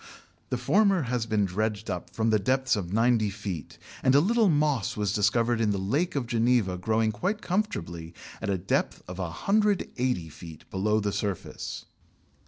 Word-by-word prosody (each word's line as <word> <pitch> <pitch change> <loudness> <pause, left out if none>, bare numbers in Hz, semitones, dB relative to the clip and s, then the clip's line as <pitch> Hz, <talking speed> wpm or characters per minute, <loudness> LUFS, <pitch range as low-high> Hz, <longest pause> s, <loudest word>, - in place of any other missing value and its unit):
The - - -1
former 200 -5 +3
has 120 -2 -1
been 105 -2 +2
dredged 105 +3 -2
up 90 - -4
from 110 0 0
depths 130 +6 +2
of 90 -4 -4
ninety 115 0 +3
feet, 95 -7 -6 0.2
and 130 0 +4
a - - +8
little 220 +5 +3
moss 145 - +1
was 105 -1 0
discovered 115 +3 +2
in 110 - +2
the 100 - 0
Lake 145 - 0
of 135 -3 0
Geneva 115 -4 +2
growing 110 +4 +1
quite 185 - -2
comfortably 85 - -2 0.3
at - - -2
a 95 - +1
depth 90 +2 -1
of 90 +1 -7
180 130 - 0
feet 80 -2 -12
below 105 +3 +1
the 105 -1 -1
surface. 100 -2 -4
110 Hz, 165 wpm, -27 LUFS, 95-130 Hz, 0.3 s, a